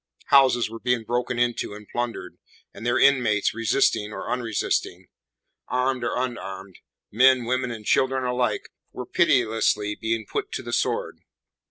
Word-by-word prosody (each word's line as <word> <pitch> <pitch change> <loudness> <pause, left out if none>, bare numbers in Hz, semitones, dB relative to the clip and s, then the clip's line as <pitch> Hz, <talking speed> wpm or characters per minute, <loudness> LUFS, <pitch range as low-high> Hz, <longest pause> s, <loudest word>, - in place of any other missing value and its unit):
Houses 130 -4 +5
were 115 +1 -9
being 125 -1 0
broken 120 +2 -2
into 120 -3 -1
and 105 0 -12
plundered, 120 -7 -5 0.3
and - - -11
their 120 +1 +1
inmates 125 -7 +3
resisting 115 -2 +1
or - - -6
unresisting; 110 -6 -2 0.6
armed 125 0 0
or 120 - -1
unarmed; 95 -7 -5 0.3
men, 130 +2 +4
women 125 +1 -1
and 110 -2 -7
children 130 +2 +2
alike 125 0 -1 0.2
were 125 - -7
pitilessly 115 -8 +2
being 110 +1 -2
put - - -4
to - - -4
the - - -6
sword. - - -1
120 Hz, 145 wpm, -24 LUFS, 110-125 Hz, 0.6 s, Houses